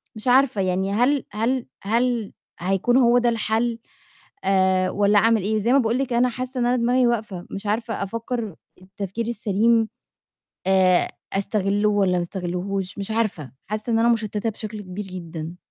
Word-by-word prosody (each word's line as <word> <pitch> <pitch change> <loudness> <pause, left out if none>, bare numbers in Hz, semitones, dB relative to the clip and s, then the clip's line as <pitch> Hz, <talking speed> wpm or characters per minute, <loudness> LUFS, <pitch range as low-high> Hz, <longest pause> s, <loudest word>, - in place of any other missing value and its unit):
مش 215 +3 -4
عارفة، 250 -4 +4
يعني 190 +1 0
هل 255 +5 +2
هل 235 +4 -1 0.2
هل 230 0 0 0.3
هيكون 195 +7 +1
هو 245 -2 +5
ده 240 0 +3
الحل؟ 230 +1 0 0.6
آآ 190 -1 +2
والّا 205 0 +3
أعمل 225 -1 +3
إيه، 215 +1 0
زي 230 +4 +1
ما - - +6
باقول 230 0 +1
لِك 265 -3 -1
أنا 245 +1 +3
حاسّة 255 +1 -5
إن 240 - +1
أنا 245 - +2
دماغي 245 +1 +3
واقفة، 215 -6 -2
مش 200 +1 -4
عارفة 225 0 -1
أفكّر 230 -1 -4 0.3
التفكير 195 +4 -5
السليم، 225 0 +2 0.8
آآ 185 -2 +4 0.2
أستغلُه 200 +1 +1
والّا 195 -3 +2
ما 175 - 0
استغلّهوش 185 +2 -4
مش 200 +2 -2
عارفة، 200 - -1
حاسّة 215 +3 -3
إن 225 - +3
أنا 235 +1 +3
مشتّتة 220 -1 0
بشكل 215 0 -7
كبير 190 +2 -6
جدًا. 170 -2 -7
215 Hz, 165 wpm, -23 LUFS, 195-235 Hz, 0.8 s, ما